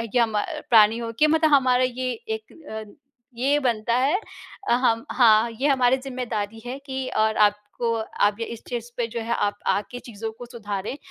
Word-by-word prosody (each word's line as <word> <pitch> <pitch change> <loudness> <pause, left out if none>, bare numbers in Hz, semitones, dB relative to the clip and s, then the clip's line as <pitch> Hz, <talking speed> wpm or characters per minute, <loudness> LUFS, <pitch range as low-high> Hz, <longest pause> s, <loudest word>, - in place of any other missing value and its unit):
या 235 - +5
म 215 -2 -1 0.3
प्राणी 220 -1 +6
होके 230 +6 +1
मतलब 315 0 +3
हमारा 255 -2 +4
ये 255 0 -1 0.2
एक 220 0 -5 0.4
अ, - - -15 0.4
ये 275 +4 +2
बनता 235 -3 0
है 285 +10 +2 0.5
अ, - - +5
हम 230 -2 +2
हाँ, 230 -2 +5
ये 260 +6 -1
हमारी 260 -2 +3
ज़िम्मेदारी 240 -5 -4
है 255 +2 -5
कि 265 -1 -4
और 220 0 +2
आपको 210 0 +3 0.5
अब 205 +1 +3
इस 230 0 -6
चीज़ 240 -1 -4
पे 240 - 0
जो 235 +1 -5
है 235 +1 -1
आप 205 -2 0
आ - - +3
के 245 - -6
चीज़ों 225 -2 -7
को 245 - -8
सुधारें, 210 0 -5
235 Hz, 185 wpm, -24 LUFS, 220-255 Hz, 0.5 s, प्राणी